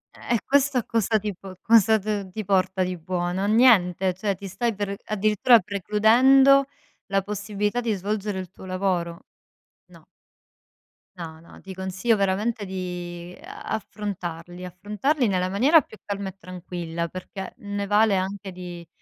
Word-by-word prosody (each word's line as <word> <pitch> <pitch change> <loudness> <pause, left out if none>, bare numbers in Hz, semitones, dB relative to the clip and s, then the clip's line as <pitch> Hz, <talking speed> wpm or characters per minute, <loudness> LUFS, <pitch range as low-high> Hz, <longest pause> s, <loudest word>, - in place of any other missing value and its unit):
Eh, 235 - -1
questo 280 -1 +3
a - - -3
cosa 225 -1 +1
ti 205 -2 -4
po 185 0 -11
cosa 220 0 +5
d 205 -2 -3
ti 215 +3 -4
porta 190 -1 +1
di 180 0 -3
buono? 175 +2 -2
A - - +1
niente, 195 -5 +4
cioè, 195 +2 -2
ti 200 +1 -8
stai 225 +5 -1
per 200 -1 -3
addirittura 215 +3 +4
precludendo 235 +8 +4 0.4
la 195 -1 +1
possibilità 210 +3 -2
di 230 -2 0
svolgere 205 0 -3
il 185 -2 -7
tuo 190 - -13
lavoro. 185 -2 -2 0.7
No. - - -16 1.1
No, 160 -3 -8
no, 170 - -15
ti 190 - -9
consiglio 190 +5 0
veramente 205 +2 0
di 180 -2 -6
affrontarli 180 -5 -6
affrontarli 210 - -1
nella 185 -1 0
maniera 275 - +5
più 215 - -15
calma 200 -1 -3
e 190 - -13
tranquilla, 175 -2 -5
perché 185 +2 -8
ne 205 0 -4
vale 210 0 +4
anche 195 +1 -3
di 175 -2 -9
195 Hz, 150 wpm, -24 LUFS, 185-215 Hz, 1.1 s, cosa